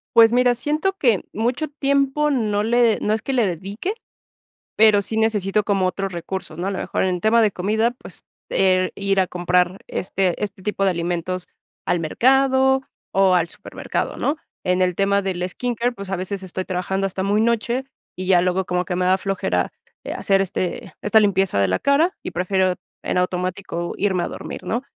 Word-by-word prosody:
Pues, 230 0 +7
mira, 245 0 +4
siento 300 +9 0
que 235 - +2
mucho 245 +8 -1
tiempo 280 +1 +1
no 210 -5 0
le 235 -1 +3
no 210 - 0
es 220 - -1
que 270 - -3
le 245 -5 +2
dedique, 195 - -4 0.8
pero 215 -1 +6
sí 220 +2 -2
necesito 210 -2 +1
como 195 -3 +1
otros 195 +1 -2
recursos, 175 -1 -6
¿no?, 180 - -2
a - - 0
lo 195 - -3
mejor - - -1
en 180 -2 -1
tema 230 +2 +4
de 215 - +4
comida, 220 +6 0
pues, 245 - -10 0.3
del, 185 -1 +2
ir 195 -1 0
a 185 - +2
comprar 180 +1 +1
este 185 -1 -1
este 195 -2 -7
tipo 200 -1 -1
de 190 - +4
alimentos 175 +1 -3 0.4
al 175 - +1
mercado 265 - +3 0.3
o 190 -1 +4
al 170 -1 +2
supermercado, - - -4
¿no?, 295 +3 0 0.3
en 180 0 +1
el 180 -1 +1
tema 200 +2 +2
del 185 -1 -2
skin 245 +5 -3
care, 240 +2 0
pues, 200 -4 -8
a 190 - 0
veces 190 +2 -4
estoy 185 0 -5
trabajando 190 +2 -1
hasta 190 0 -3
muy 205 +2 +2
noche, 235 +3 0 0.3
y 185 0 -6
ya 180 -2 +5
luego 185 +1 0
como 180 0 0
que 180 - -3
me 180 0 0
da 185 - +4
flojera, 185 - -1 0.3
eh, - - -4
hacer 195 -1 +2
este 185 -1 -3
esta 210 +1 +4
limpieza 195 - +2
de 100 - +3
la 95 - +1
cara 310 +6 +2
y - - -6
prefiero 185 +1 +1 0.3
en - - -2
automático 180 -1 -2
irme 190 -3 0
a - - -2
dormir, - - -7
¿no?, 235 +3 -1
195 Hz, 195 wpm, -21 LUFS, 185-230 Hz, 0.8 s, Pues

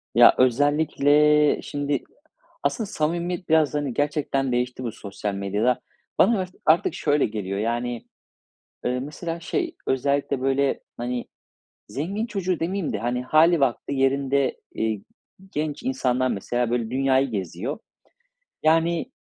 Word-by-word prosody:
Ya 120 0 +8
özellikle 145 +3 +4
şimdi 145 -1 -2 0.6
aslında 225 -4 0
samimiyet 175 0 -2
biraz 155 -3 +4
hani 145 -3 -1
gerçekten 145 -1 0
değişti 125 +1 -1
bu 120 - -2
sosyal 100 0 -5
medyada. 105 +6 0 0.4
Bana 230 -3 +5
art 185 -1 -4
artık 160 +2 +4
şöyle 145 0 +2
geliyor. 100 -2 -3
Yani, 120 +1 -2 0.8
ııı, 125 +1 0
mesela 165 +4 -5
şey, 345 - -2
özellikle, 140 0 0
böyle, 135 +1 +1 0.2
hani, 120 0 -3 0.6
zengin 195 - -2
çocuğu 185 -5 -2
demeyeyim 180 +1 -2
de - - -2
hani 120 +1 -1
hâli 160 +5 +4
vakti 135 0 0
yerinde, 135 0 +1 0.2
ııı, 110 -1 0 0.5
genç 150 0 -3
insanlar 130 -1 +1
mesela 120 +4 -1
böyle 120 -2 0
dünyayı 135 0 +2
geziyor. 100 - -4 0.8
Yani, 165 +7 +2
140 Hz, 125 wpm, -24 LUFS, 125-155 Hz, 0.8 s, Ya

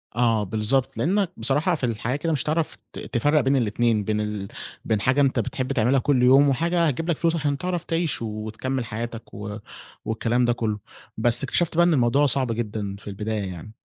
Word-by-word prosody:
آه 115 -3 +2
بالضبط، 110 +6 -1
لإنّك 190 +1 +1
بصراحة 150 +6 +2
في 150 - -9
الحياة 120 +2 -2
كده 165 +3 -1
مش 145 - 0
هتعرف 155 +1 -1 0.2
ت - - -7
تفرّق 145 +5 +1
بين 135 +2 +2
الاتنين 115 -2 +1
بين 105 +1 -1
ال 105 -2 -4 0.4
بين 110 -3 0
حاجة 130 +6 +3
أنت 135 -3 +2
بتحب 130 +3 -2
تعملها 125 +4 +3
كل 130 -1 +2
يوم 135 +3 +6
وحاجة 170 +5 +1
هتجيب 165 +5 -2
لك 165 - +1
فلوس 165 +1 +1
عشان 145 -3 0
تعرف 180 +1 -2
تعيش 165 -5 -1
وتكمّل 115 +4 -3
حياتك 115 +1 -6
و 105 +1 -6 0.5
والكلام 115 +2 +1
ده 120 - +2
كُلّه، 110 -3 -2 0.4
بس 120 +3 +3
اكتشفت 165 +4 0
بقى 175 - +6
إن 175 - +3
الموضوع 135 +1 +3
صعب 130 -2 +2
جدًا 105 -3 -3
في 105 - -15
البداية 105 +1 -3
يعني. 90 +4 -9
125 Hz, 195 wpm, -24 LUFS, 110-145 Hz, 0.5 s, يوم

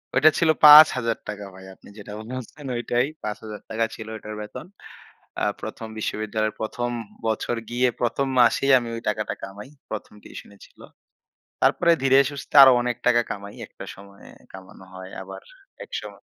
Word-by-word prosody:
ওইটা 150 +5 +6
ছিল 165 - +2 0.2
৳৫,০০০ 115 -8 +6
ভাই। 95 0 -13
আপনি - - -18
যেটা 105 0 -10
বলছেন 130 +5 -8
ঐটাই। 120 +2 0 0.2
৳৫,০০০ 110 +1 -4
ছিল 110 -1 -9
ওইটার 110 0 -8
বেতন। 105 +9 -9 0.8
আ - - -1 0.2
১ম 115 - -7
বিশ্ববিদ্যালয়ের 110 0 -3
১ম 120 +2 -3 0.4
বছর 110 +2 -1
গিয়ে 125 +1 +1
১ম 135 +3 0
মাসেই 130 +3 +4
আমি 120 -1 -7
ওই 115 - -6
টাকাটা 105 0 -3
কামাই। 100 +6 -9 0.2
১ম 110 -1 -7
টিউশনি 100 - -12
ছিল। - - -26 0.8
তারপরে 170 - +3
ধীরে 135 0 +5
সুস্থে 140 0 -10
আরো 130 -1 +9
অনেক 125 -1 -2
টাকা 120 -1 +5
কামাই। 100 -1 -7
একটা - - -12
সময়ে 100 0 -15 0.2
কামানো 95 0 -13
হয় 95 0 -10
আবার 95 0 -10 0.4
এক - - -21
সময় - - -11
110 Hz, 150 wpm, -23 LUFS, 105-125 Hz, 0.8 s, আরো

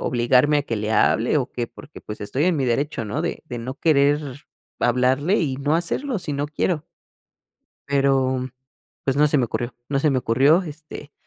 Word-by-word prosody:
obligarme 125 +5 +3
a 145 - -1
que 115 - -3
le 105 +1 -2
hable, 120 +7 +3
¿o 130 - -3
qué?", 120 -1 -3
porque 150 - -13
pues 105 - -8
estoy 130 +8 -1
en 180 -3 +2
mi 135 -2 0
derecho, 125 0 -1
¿no?, 145 +10 -3
de 170 - -3
de 125 - -6
no 125 +3 -5
querer 145 -2 +1 0.4
hablarle 130 - +2
y 135 -5 -1
no 145 +3 0
hacerlo 215 +8 -1
si 155 - -5
no 145 +1 -1
quiero. 155 +1 -2 1.0
Pero, 135 -2 +1 0.5
pues, 135 0 0
no 150 - +5
se 145 - +2
me 130 - +2
ocurrió, 120 +2 -4
no 140 -1 0
se 150 +1 +3
me 130 - +1
ocurrió, 135 +10 +3
este, 150 -2 -10
140 Hz, 190 wpm, -22 LUFS, 125-150 Hz, 1.0 s, no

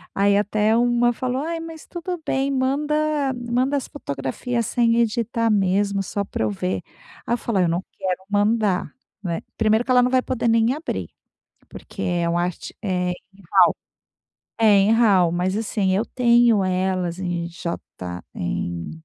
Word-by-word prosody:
Aí 200 0 +3
até 210 +1 +2
uma 240 0 +3
falou: 255 +2 -2
"Ai, 330 +1 -3
mas 325 -1 -9
tudo 350 0 -5
bem. 270 +1 0
Manda 290 +1 0
manda 250 +3 0
as 270 - -4
fotografias 235 - -3
sem 235 -2 +2
editar 230 0 +1
mesmo 200 0 +1
só 200 +2 -3
pra 190 - -3
eu 110 - 0
ver." 95 -1 -2 0.4
Aí 235 - 0
falei 200 -6 0
"Eu - - +1
não 170 +3 -1
quero 185 0 -2
mandar", 205 -2 +1 0.3
né? 170 -3 -2 0.2
Primeiro 220 +1 +2
que 260 - -1
ela 250 0 +6
não 250 0 +1
vai 260 -1 +4
poder 250 -2 -2
nem 230 +1 +3
abrir, 310 +4 -4 0.6
porque - - -10
é 175 -1 0
uma 170 +1 +1
arte, 175 -1 -4
eh, 180 -3 -1
em 195 +2 -12
RAW. - - +5 0.8
É 225 - +3
em 205 -1 +5
RAW, 200 -7 +4
mas 180 +2 0
assim, 205 -3 0
eu 210 +4 0
tenho 235 -4 +4
elas 185 -1 -1
em 175 -2 -2
j 170 0 -4 0.6
em, 85 -1 -3
215 Hz, 165 wpm, -22 LUFS, 185-245 Hz, 0.8 s, ela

